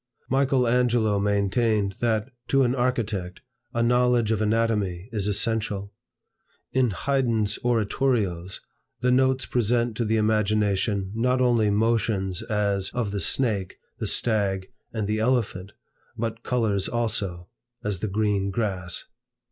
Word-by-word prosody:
Michael 135 -2 +2
Angelo 115 -4 +2
maintained, 100 0 +1
that, 115 +1 0 0.2
to 135 0 +3
an 125 -1 +2
architect, 110 -8 -2 0.3
a 115 -2 0
knowledge 125 -1 +3
of 110 -1 0
anatomy 105 -4 0
is 105 -3 -1
essential. 105 -1 -1 0.8
In 130 -2 +2
Haydn's 115 -1 0
oratorios, 110 -6 0 0.4
the 125 0 +2
notes 130 +1 +3
present 120 -1 0
to 120 - +1
the 110 0 +1
imagination 105 -2 +1
not 125 +3 +1
only 120 -4 +3
motions, 105 -3 +1
as, 100 -3 0
of 115 -5 -1
the 100 - -2
snake, 105 -6 0 0.2
the - - -2
stag, 100 -4 0 0.2
and 110 -3 -2
the 105 +1 -1
elephant, 110 -5 0 0.5
but 115 0 -3
colors 110 -6 0
also; 105 -7 -2 0.3
as 105 -5 -1
the 110 - -2
green 100 -1 0
grass. 95 -4 -2
110 Hz, 125 wpm, -25 LUFS, 100-120 Hz, 0.8 s, to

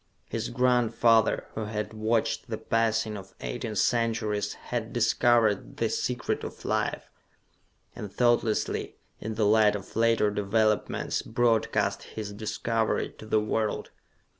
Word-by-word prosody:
His 115 +1 -3
grandfather, 115 -3 +3
who 110 - -3
had 105 0 -4
watched 110 +1 0
the - - -2
passing 115 -1 0
of 95 -1 -10
eighteen 85 - -4
centuries, 110 -3 0
had - - -5
discovered 115 -4 +2
the - - +1
Secret - - -2
of - - -8
Life - - -1 0.9
and 105 - -7
thoughtlessly, 120 -2 +1 0.2
in 110 0 -5
the 110 -1 +1
light 105 0 +5
of 100 - -8
later 115 -2 +3
developments, 105 +1 0
broadcast 115 -1 +1 0.2
his 105 -2 -4
discovery 110 +1 -1
to 110 - -10
the 110 - +3
world. 110 0 -1
110 Hz, 125 wpm, -27 LUFS, 105-115 Hz, 0.9 s, light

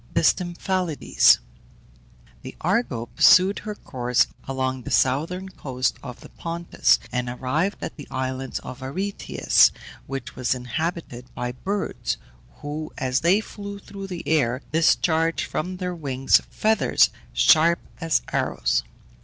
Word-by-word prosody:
THE 165 - +3
STYMPHALIDES. 175 -1 +3 1.0
The - - -9
Argo 175 - 0
pursued 185 +9 +5
her 210 0 -6
course 125 - +1 0.2
along 130 -1 -2
the - - -7
southern 165 +9 +1
coast 130 -8 -2
of 125 -3 -9
the - - -12
Pontus, 165 - +1
and 125 0 -2
arrived 140 +10 -1
at - - -6
the 145 - -9
island 130 0 -3
of 125 +1 -8
Aretias, 190 +10 +2 0.4
which 135 0 -6
was 130 0 0
inhabited 125 0 -4
by 125 0 -3
birds, 195 +11 -3 0.5
who, 150 +2 -5
as 130 -2 0
they 185 +6 +3
flew 200 -2 -8
through 195 -1 -9
the 180 -3 -7
air, 130 -5 +1
discharged 165 +1 +2
from 185 +4 -4
their 180 -1 -3
wings 135 -5 +2
feathers 220 0 +3 0.2
sharp 155 - +5 0.2
as 165 -1 +1
arrows. - - +1
155 Hz, 130 wpm, -24 LUFS, 130-180 Hz, 1.0 s, pursued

